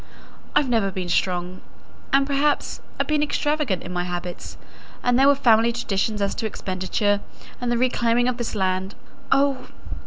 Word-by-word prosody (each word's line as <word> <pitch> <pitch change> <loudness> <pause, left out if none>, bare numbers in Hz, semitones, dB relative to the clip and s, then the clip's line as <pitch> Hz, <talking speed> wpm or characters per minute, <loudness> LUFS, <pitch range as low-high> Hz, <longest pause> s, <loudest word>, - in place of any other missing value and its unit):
I've 290 - +4
never 225 -5 +2
been 185 -2 -4
strong, 180 +1 -1 0.5
and, 275 0 +4
perhaps, 285 +1 0 0.2
I've - - +2
been 305 -1 +1
extravagant 295 - 0
in 180 - -6
my 175 0 -1
habits; 175 0 -6 0.5
and 245 0 +3
there 270 - +6
were 285 - +6
family 235 -3 +4
traditions 210 -2 -1
as 200 - 0
to 220 - -1
expenditure, 200 +1 -1 0.4
and 245 -1 -1
the 240 - +2
reclaiming 245 -1 +2
of 250 -1 0
this 240 -3 -3
land. 190 0 -1 0.4
Oh! 275 -1 +2
230 Hz, 160 wpm, -23 LUFS, 185-265 Hz, 0.5 s, there